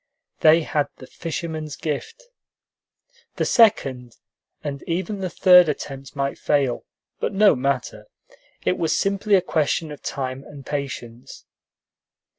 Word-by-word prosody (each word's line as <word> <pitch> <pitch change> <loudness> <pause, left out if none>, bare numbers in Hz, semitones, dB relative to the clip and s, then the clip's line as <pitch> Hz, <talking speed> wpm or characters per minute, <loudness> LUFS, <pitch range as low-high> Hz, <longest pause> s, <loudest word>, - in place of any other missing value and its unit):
They 160 +1 +6
had 150 -1 0
the 130 - -11
fisherman's 160 0 -5
gift. 155 - -5 1.1
The - - 0
second, 130 - +3 0.5
and 140 -2 -4
even 190 +4 -2
the 185 -1 -2
third 180 -1 +6
attempt 135 -2 -6
might 140 -1 -2
fail, 140 -4 0 0.3
but - - -2
no 200 -3 +5
matter; 135 0 -2 0.6
it - - +1
was 165 -2 +1
simply 200 +1 +2
a 190 - +4
question 160 -1 0
of 150 - -9
time 130 -1 -4
and 140 -2 -12
patience. 130 -4 -6
150 Hz, 125 wpm, -23 LUFS, 135-180 Hz, 1.1 s, They